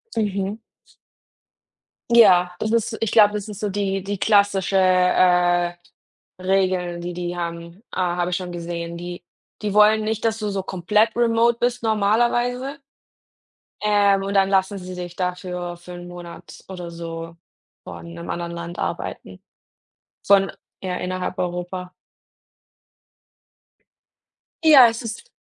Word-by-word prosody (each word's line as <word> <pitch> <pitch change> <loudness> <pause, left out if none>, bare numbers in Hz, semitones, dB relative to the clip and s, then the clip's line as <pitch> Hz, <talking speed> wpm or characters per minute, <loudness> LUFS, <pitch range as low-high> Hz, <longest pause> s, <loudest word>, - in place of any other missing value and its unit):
Mhm. 200 -1 -1 1.5
Ja, 180 -6 +6
das 215 - -1
ist 230 0 0
ich 225 - 0
glaube, 210 -2 +6
das 210 0 -4
ist 210 -1 -8
so 210 - -1
die 195 -1 -1
die 200 +2 -4
klassische, 200 -1 +2
äh, 180 -1 +3 0.7
Regel, 185 -2 0
die 175 +1 -4
die 175 0 -4
haben 170 0 -5 0.2
äh, - - -6
habe 175 -1 0
ich 175 - 0
schon 180 -1 -6
gesehen. 170 0 -5
Die 175 0 -7 0.4
die 210 -2 -2
wollen 210 +1 +5
nicht, 220 0 -2
dass 225 -1 +1
du 210 - -2
so 195 -1 -3
komplett 210 +5 +1
remote 235 0 +3
bist, 245 0 -1
normalerweise. 240 +6 +1 1.0
Ähm, 205 -2 +3
und 195 +1 -3
dann 195 -1 +3
lassen 195 +1 +1
sie 185 0 -8
dich 175 -1 -7
dafür 180 -1 -4
für 175 +1 -13
'nen 175 0 -9
Monat 175 -1 -11
oder 180 -2 -7
so 165 0 -7 0.5
von - - -9
einem 170 0 -9
anderen 170 0 -4
Land 170 0 -7
arbeiten. 95 0 -5 0.9
Von 195 -1 +4 0.3
ja, 185 -1 -3
innerhalb 185 +1 -4
Europa. 180 0 -4 2.7
Ja, 290 -6 +9
es 225 0 -5
ist 230 - -7
190 Hz, 135 wpm, -22 LUFS, 175-210 Hz, 2.7 s, Ja